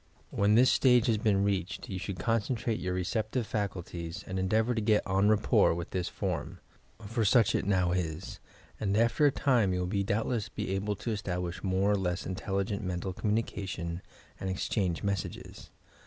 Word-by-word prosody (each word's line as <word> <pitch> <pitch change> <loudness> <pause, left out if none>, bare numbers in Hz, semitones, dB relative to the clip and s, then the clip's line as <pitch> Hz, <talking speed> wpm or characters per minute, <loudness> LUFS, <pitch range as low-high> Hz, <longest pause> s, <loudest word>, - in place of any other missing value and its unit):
When 100 +1 +3
this 125 +3 +6
stage 125 -3 +4
has 115 -4 +2
been 100 -2 +2
reached 100 -2 -2
you 95 -2 -4
should 100 0 -5
concentrate 115 +3 0
your 90 0 -2
receptive 110 +6 -1
faculties 90 -4 -4
and 95 0 -3
endeavour 110 +6 +2
to 115 - -1
get 105 0 +3
en 95 +2 +3
rapport 105 -5 +4
with 85 0 -5
this 90 -2 -2
form 90 -7 -3 0.5
(for 115 +2 -1
such 115 +2 +4
it - - 0
now 90 -3 +2
is) 90 -1 -3 0.4
and 100 -1 0
after 115 +6 +4
a - - +3
time 120 -10 +2
you 90 - -1
will 100 +2 0
doubtless 110 +2 -1
be - - -4
able 100 +2 -1
to 115 - -4
establish 90 -4 -3
more 95 +1 +2
or 105 - +3
less 95 0 -2
intelligent 95 +2 -2
mental 90 0 -3
communication 95 -5 -2 0.4
and 95 - -3
exchange 95 -2 -1
messages. 100 -3 -4
100 Hz, 170 wpm, -30 LUFS, 90-110 Hz, 0.5 s, this